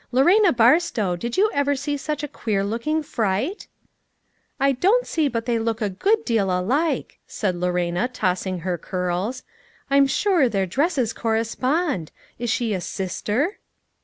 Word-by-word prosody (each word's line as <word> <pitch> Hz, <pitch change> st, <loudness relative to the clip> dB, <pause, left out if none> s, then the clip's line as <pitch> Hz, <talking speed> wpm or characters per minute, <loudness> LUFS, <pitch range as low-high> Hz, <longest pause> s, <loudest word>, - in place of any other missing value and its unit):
Lorena 350 Hz, -, +5 dB
Barstow, 235 Hz, -, +3 dB
did 235 Hz, +7 st, -4 dB
you 425 Hz, +3 st, +4 dB
ever 285 Hz, 0 st, +1 dB
see 290 Hz, +2 st, -2 dB
such 295 Hz, +1 st, -4 dB
a -, -, -2 dB
queer 210 Hz, -7 st, -2 dB
looking 235 Hz, +10 st, -1 dB
fright 225 Hz, -, -2 dB, 0.3 s
?" -, -, -49 dB
" -, -, -45 dB
I 275 Hz, 0 st, +4 dB
don't 395 Hz, -, +2 dB
see 315 Hz, -3 st, 0 dB
but 230 Hz, -3 st, -3 dB
they 235 Hz, -2 st, +1 dB
look 225 Hz, 0 st, -1 dB
a 210 Hz, -4 st, -1 dB
good 425 Hz, -, +1 dB
deal 220 Hz, -5 st, +1 dB
alike," 240 Hz, -, 0 dB
said 190 Hz, -4 st, -2 dB
Lorena, 180 Hz, +3 st, 0 dB
tossing 185 Hz, -6 st, -2 dB
her 180 Hz, -1 st, -2 dB
curls; 185 Hz, +9 st, -3 dB, 0.2 s
" -, -, -32 dB
I'm 275 Hz, 0 st, +5 dB
sure 340 Hz, -3 st, +2 dB
their 195 Hz, -3 st, 0 dB
dresses 265 Hz, -, 0 dB
correspond; 230 Hz, -, -1 dB, 0.3 s
is 240 Hz, 0 st, -2 dB
she 225 Hz, -1 st, 0 dB
a 185 Hz, -, -2 dB
sister 210 Hz, -, -2 dB
235 Hz, 160 wpm, -23 LUFS, 195-290 Hz, 0.3 s, Lorena